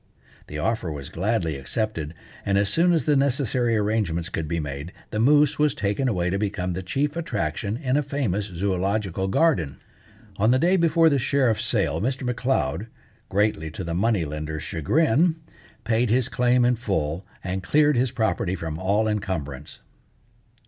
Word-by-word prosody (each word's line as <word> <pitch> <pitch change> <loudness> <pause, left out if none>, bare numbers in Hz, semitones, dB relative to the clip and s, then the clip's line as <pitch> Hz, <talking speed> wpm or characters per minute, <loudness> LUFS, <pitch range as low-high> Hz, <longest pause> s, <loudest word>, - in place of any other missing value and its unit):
The 75 - -6
offer 100 0 -1
was 70 -2 -6
gladly 90 -5 -1
accepted; 80 - -3 0.3
and 100 -1 +1
as 100 0 +2
soon 170 - +3
as 165 -5 +2
the 150 - +3
necessary 130 -4 +1
arrangements 100 -6 0
could 80 -4 -3
be 85 +2 -1
made, 75 +3 -5 0.2
the 105 - -2
moose 145 +5 +4
was 150 -3 +3
taken 105 +7 0
away 90 -6 0
to 95 - 0
become 95 -3 -2
the 90 - -4
chief 140 - -1
attraction 105 - -2
in 130 -2 -1
a - - +3
famous 130 -9 -1
zoological 95 +1 -1
garden. 95 - +1 0.6
On 110 +3 +3
the 125 - +5
day 175 +7 +3
before 165 -2 +4
the 140 -3 +3
sheriff's 130 -4 +1
sale - - 0
Mr. 130 +4 -1
M'Leod, 125 -5 -1 0.4
greatly 100 -5 +1
to 80 - -6
the 85 -1 -3
money 100 -1 +1
lender's 75 +1 -5
chagrin, 155 - +2 0.5
paid 115 +1 +1
his 125 +3 +2
claim 125 -1 +3
in 125 0 +2
full, 90 -7 -2 0.2
and 95 0 -3
cleared 145 - +3
his 125 +1 +2
property 110 -5 -1
from 80 -3 -5
all 100 +4 +1
encumbrance. 80 -10 -4
105 Hz, 165 wpm, -24 LUFS, 90-130 Hz, 0.6 s, the